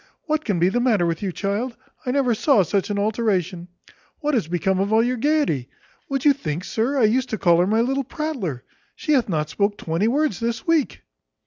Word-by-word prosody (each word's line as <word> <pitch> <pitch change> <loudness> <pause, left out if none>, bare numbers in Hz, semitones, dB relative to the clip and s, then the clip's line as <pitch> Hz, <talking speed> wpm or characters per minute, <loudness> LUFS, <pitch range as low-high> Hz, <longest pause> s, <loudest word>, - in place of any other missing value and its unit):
What 310 -1 -1
can 205 -5 -1
be 175 +2 +3
the 240 - 0
matter 225 -8 +2
with 165 -1 -2
you, 195 -2 -2
child? 210 +7 -3 0.3
I - - +1
never 255 -2 +2
saw 225 -1 +3
such 195 +3 -1
an 205 - -1
alteration. 200 -5 -1 0.5
What 300 -1 -1
is 225 - +1
become 185 +2 0
of 200 +2 0
all 220 +1 +4
your 250 +1 0
gaiety? 250 - 0 0.4
Would 275 -1 -2
you 290 - +7
think, 170 - -4
sir, 235 +8 -1
I 255 - +3
used 250 +4 +2
to 220 - -2
call 170 -3 +4
her 180 - +3
my 220 +3 +2
little 270 +3 0
prattler? 250 - -4 0.3
She 305 - -3
hath 255 -6 +2
not 155 -3 -1
spoke 205 0 0
twenty 165 +6 -1
words 285 - +1
this 230 0 -3
week." 330 -5 0
220 Hz, 215 wpm, -22 LUFS, 185-265 Hz, 0.5 s, you